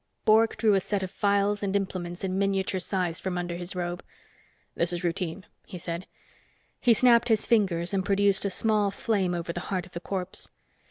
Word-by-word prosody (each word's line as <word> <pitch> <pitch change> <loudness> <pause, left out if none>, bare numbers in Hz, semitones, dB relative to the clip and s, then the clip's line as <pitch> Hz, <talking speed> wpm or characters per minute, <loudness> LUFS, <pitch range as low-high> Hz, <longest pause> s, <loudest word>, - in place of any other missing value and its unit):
Bork 220 +1 +4
drew 220 -2 +3
a 195 - +4
set 195 +1 -2
of 185 - -5
phials 200 0 +1
and 200 -1 -1
implements 185 -3 -3
in 185 -1 -1
miniature 195 -1 0
size 180 -2 -2
from 185 -2 -3
under 175 -1 -3
his 175 +1 -6
robe. 175 -1 -3 0.7
"This 170 +1 +1
is 175 +1 -3
routine," 175 +2 -2 0.2
he 180 - -7
said. 170 +1 -5 0.7
He 240 -2 +5
snapped 240 0 +5
his 220 -2 +3
fingers 185 -6 +1
and 190 -1 +1
produced 200 0 +2
a 200 - 0
small 210 +1 +2
flame 195 -3 0
over 170 0 -3
the 175 - -4
heart 185 -2 -1
of 185 - -17
the 170 - -5
corpse. 185 0 -4
190 Hz, 195 wpm, -27 LUFS, 175-200 Hz, 0.7 s, He